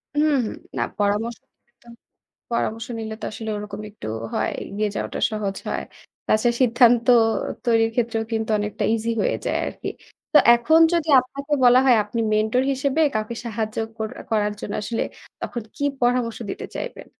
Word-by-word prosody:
হুম, 300 0 +3
হুম, - - -5 0.2
না - - 0 0.2
পরামর্শ 210 +3 0 1.2
পরামর্শ 225 -1 -1
নিলে 220 -1 -4
তো - - -6
আসলে 220 +1 -5
ওরকম 205 0 -7
একটু 205 - -10 0.3
হয়। - - 0
এগিয়ে 210 +1 -2
যাওয়াটা - - -3
সহজ 205 -3 -3
হয়। - - -2 0.4
তাছাড়া 235 +2 +2
সিদ্ধান্ত 240 -1 +5 0.6
তৈরির 225 -2 +3
ক্ষেত্রেও 230 -2 0
কিন্তু 220 0 -1
অনেকটা 210 0 -2
ইজি 230 +1 -1
হয়ে - - +1
যায় - - +1
আরকি। - - -6 0.4
তো 300 - +8 0.2
এখন 305 +8 +4
যদি 335 -2 +1
আপনাকে 280 +3 -8
বলা 245 +1 +7
হয় 245 - +6
আপনি 220 +3 -3
মেন্টর 220 +4 +2
হিসেবে 275 +3 0
কাউকে 215 +2 -2
সাহায্য 220 -1 -3 0.2
কর 220 -1 -3 0.2
করার 210 -2 +1
জন্য 205 - -5
আসলে 225 +2 -2 0.4
তখন 235 - -4
কি 285 - -2 0.2
পরামর্শ 240 -1 +1
দিতে - - -5
চাইবেন? - - -6
230 Hz, 155 wpm, -23 LUFS, 215-245 Hz, 1.2 s, তো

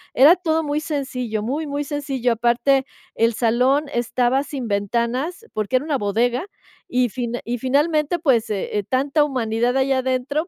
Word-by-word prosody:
era 290 +7 +8
todo 325 -3 0
muy 295 0 -1
sencillo, 255 -8 -3
muy, 290 +7 -2
muy 285 +1 -2
sencillo. 275 -4 -2
Aparte, 240 +4 +2 0.3
el 230 0 +1
salón 250 +6 +2
estaba 245 +2 +1
sin 275 -4 -5
ventanas, 235 - -1
porque 215 +4 -1
era 255 +3 +1
una 295 -4 -1
bodega, 235 - 0 0.4
y 250 0 +1
fin 240 +1 -4
y 240 +1 -3
finalmente, 300 +5 +1
pues, 265 -9 +2
eh, 205 0 -2
tanta 275 +3 +2
humanidad 245 -3 0
ahí 265 +1 +1
adentro, 260 +4 0
260 Hz, 155 wpm, -21 LUFS, 235-290 Hz, 0.4 s, era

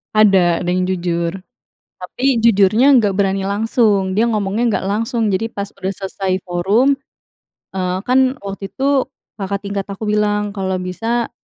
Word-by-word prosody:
Ada, 190 -5 +4
ada 175 - -2
yang 185 0 0
jujur. 170 -2 -1 0.6
Tapi, 245 +7 -1
jujurnya 225 +5 +5
nggak 205 -3 +1
berani 195 -1 +1
langsung. 205 -2 +1
Dia 220 +4 +2
ngomongnya 215 +2 0
nggak - - -5
langsung, 225 +2 -1
jadi 225 +4 0
pas 200 -1 -6
udah 190 -1 -4
selesai 190 -1 -3
forum, 195 +10 +2 0.8
eee, 185 -1 -2
kan, 260 +1 +2
waktu 195 0 -6
itu, 275 +2 0 0.3
kakak 200 0 -3
tingkat 200 -1 -3
aku 200 +2 -6
bilang, 210 -1 0
"Kalau 190 -2 -2
bisa, 225 +6 -2
200 Hz, 145 wpm, -18 LUFS, 190-225 Hz, 0.8 s, jujurnya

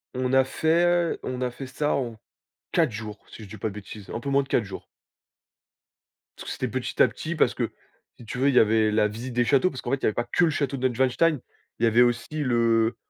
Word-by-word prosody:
on 130 0 -1
a 130 0 +6
fait 170 +5 +1
on 125 0 -4
a 125 - 0
fait 130 +2 -8
ça 145 +3 -1
en 120 -5 -3 0.5
4 165 -7 +3
jours, 105 -1 -7
si 110 - -11
je 100 - -12
dis 110 - -9
pas 110 - -2
de 100 - -8
bêtises, 105 0 -10
un 115 - -4
peu 140 - -4
moins 140 0 +3
de 135 - -11
4 115 - +1
jours. 95 -1 -9 1.5
Parce - - -9
que - - -5
c'était - - -2
petit - - -2
à - - +7
petit, - - -5
parce - - +3
que, - - -2 0.5
si 120 - -13
tu 115 +3 -6
veux, 135 +2 +3
il 135 - 0
y - - +8
avait 110 0 +3
la 105 0 +3
visite 115 +4 -7
des 120 0 +2
châteaux, 145 +8 +3
parce 130 - -8
qu'en 120 - -4
fait, 135 - +2
il - - -21
y - - +2
avait 110 - +2
pas 120 - -1
que 175 - +4
le - - +2
château 140 -2 -1
de 130 0 +1
Neuschwanstein, 130 +5 +1 0.4
il - - -2
y 115 - +6
avait 115 +2 +4
aussi 120 -1 +2 0.2
le 115 -2 +2
125 Hz, 260 wpm, -25 LUFS, 110-135 Hz, 1.5 s, y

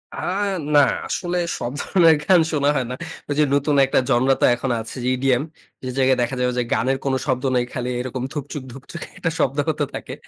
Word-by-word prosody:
আ - - -9 0.6
না, - - +8 0.3
আসলে 180 -1 -2 0.2
সব 120 - -3
ধরনের 165 -4 +5
গান 185 +2 +5
শোনা 145 -2 +2
হয় 130 -3 0
না। - - -3 0.3
ওইযে 145 +1 +2
নতুন 145 +1 +1
একটা 135 - +2
জনরা 130 +1 +4
তো - - +6
এখন 130 +1 -3
আছে 110 - -8
যে - - -1
ইডিএম 130 0 +1 0.4
যে 130 - -4
জায়গায় 130 -1 +3
দেখা 120 +2 -1
যাবে 125 0 +1
যে, 125 - +2
গানের 135 +2 +1
কোন 135 - 0
শব্দ 130 -3 -1
নাই, 125 - +3
খালি 125 0 -3
এরকম 125 0 -4
ধুপচু্‌ক, 145 -1 -5
ধুপচুক 135 +7 -10 0.2
একটা 165 - -1
শব্দ 135 +2 +1
হতে 150 -1 0
থাকে। - - -6
135 Hz, 205 wpm, -22 LUFS, 125-145 Hz, 0.6 s, না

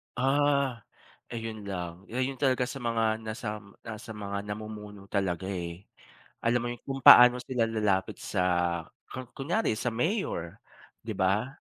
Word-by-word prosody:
Ah, 140 -1 +2 0.5
ayun 115 -3 -6
lang. 90 -1 -5
Ayun 130 +2 -2
talaga 130 -3 +3
sa 135 - -6
mga 115 -2 +1
nasam 110 -2 -6
nasa 110 0 -7
mga 100 -1 -4
namumuno 105 -1 -7
talaga, 95 -1 -1
eh. 85 -1 -5 0.6
Alam 120 +1 +3
mo 120 - -2
yun, 120 - -7
kung 135 -1 -4
paano 125 0 +10
sila 125 -3 +1
lalapit 105 -4 0
sa 90 -3 0 0.7
ku 130 - -6
kunyari 165 - 0
sa 120 +3 -1
mayor, 120 - -2 0.4
'di 110 - -4
ba? 105 +9 +1
110 Hz, 140 wpm, -29 LUFS, 100-125 Hz, 0.7 s, paano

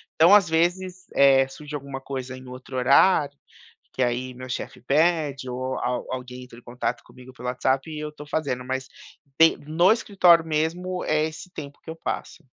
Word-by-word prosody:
então 170 +5 +6
às 195 -5 +4
vezes, 180 +3 0
eh, 135 -1 +5
surge 150 +2 -9
alguma 140 -1 -6
coisa 130 -1 -6
em 130 0 -12
outro 130 +1 -10
horário, 140 +2 +4 0.6
que - - -3
aí 125 +1 -2
meu 130 +1 -9
chefe 125 - -5
pede 145 -1 +1
ou 130 +1 -3
al 125 0 -2
alguém 125 0 -6
entra 125 -2 -14
em - - -23
contato 125 0 -4
comigo 125 +1 -15
pelo 125 0 -8
WhatsApp 130 +4 0
e 155 - -5
eu 150 0 -5
tô 150 0 -11
fazendo. 140 -5 -2
Mas 130 +1 -3 0.5
de 165 0 +7
no 170 +5 +4
escritório 185 -7 +4
mesmo, 165 +4 -2
é 155 0 +1
esse 160 +3 -8
tempo 145 -3 -9
que - - -11
eu - - -8
passo. 165 0 -5
140 Hz, 185 wpm, -24 LUFS, 130-160 Hz, 0.6 s, de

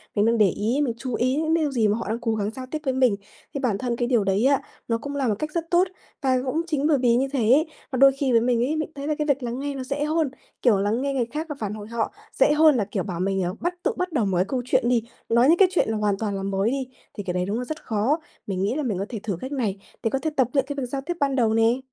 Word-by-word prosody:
mình 205 0 +3
đang 230 0 +3
để 205 -3 +5
ý, 230 - 0
mình 240 - 0
chú 255 0 -5
ý 255 +2 +1
những 315 +1 +1
điều 310 -4 +1
gì 225 -5 +2
mà 210 +2 +1
họ - - -5
đang 230 +2 -1
cố 225 -2 -1
gắng 210 0 -1
giao 255 +3 -7
tiếp 310 - -2
với 265 - +1
mình. 255 -5 +3 0.4
Thì 280 - -2
bản 235 -7 0
thân 240 +1 -2
cái 240 0 -1
điều 235 -5 +3
đấy 195 +5 +1
á, 275 0 +4 0.3
nó 230 -1 +1
cũng 285 +4 -6
là 275 -2 0
một 215 - +2
cách 305 0 -3
rất 330 +1 -3
tốt 360 +2 +4 0.3
và 260 -2 +2
cũng 310 +6 0
chính 300 -2 0
bởi 295 -3 +4
vì 245 -2 +3
như 265 +3 +2
thế 270 - +1
ấy, 305 +5 +5 0.2
mà 260 - -1
đôi 275 +1 +7
khi 275 -2 0
với 230 -1 +5
mình 240 0 +2
ấy, 300 +4 -1
mình 310 0 -2
thấy 280 +1 -5
là 305 - +1
cái 300 - -1
việc 280 -2 +1
lắng 240 +2 -3
nghe 285 0 -3
nó 265 - -4
dễ 280 +3 -2
hơn, 310 -1 +1 0.3
kiểu, 235 -5 +4
lắng 210 +5 0
nghe 280 0 -1
người 255 -3 +1
khác 300 +7 -4
và 295 - -4
phản 210 -2 -3
hồi 210 -1 -8
họ 230 -1 -2 0.3
dễ - - +6
hơn 305 -1 +6
là, 210 -5 +1
kiểu, 195 -2 -3
bảo 175 -4 -5
mình, 195 0 0
ờ, 180 +1 -2
bắt 350 +1 -1
tự - - +2
bắt 365 -1 -2
đầu 240 -8 +2
một 190 -3 0
cái 185 - +3
câu 255 -2 -1
chuyện 255 -1 +2
đi, 240 -3 +2 0.3
nói 235 +3 +5
những 340 - +6
cái 390 - +7
chuyện 360 - +1
là 220 - 0
hoàn 205 -2 +1
toàn 205 -1 -2
là 195 - -4
mới 195 +2 0
đi, 270 -2 -2 0.3
thì 205 - -6
cái 180 -2 -3
đấy 180 0 0
đúng 205 +4 -2
là 250 - -3
rất 310 +4 -6
khó. 230 +8 +1 0.3
Mình 190 -2 -2
nghĩ 210 +6 0
là 305 - -1
mình 210 -7 -1
có 195 - -2
thể 225 -4 -4
thử 200 -6 -2
cách 260 - -5
này 220 -8 -1 0.2
để 225 - +2
có 270 - -1
thể 315 - -1
tập 255 -3 +4
luyện 275 -2 +2
cái 285 - -4
việc 275 -3 -2
giao 270 +2 -4
tiếp 335 +6 -3
ban 275 -1 +1
đầu 230 -4 +2
nè. 225 +3 +3
250 Hz, 330 wpm, -24 LUFS, 215-280 Hz, 0.4 s, đôi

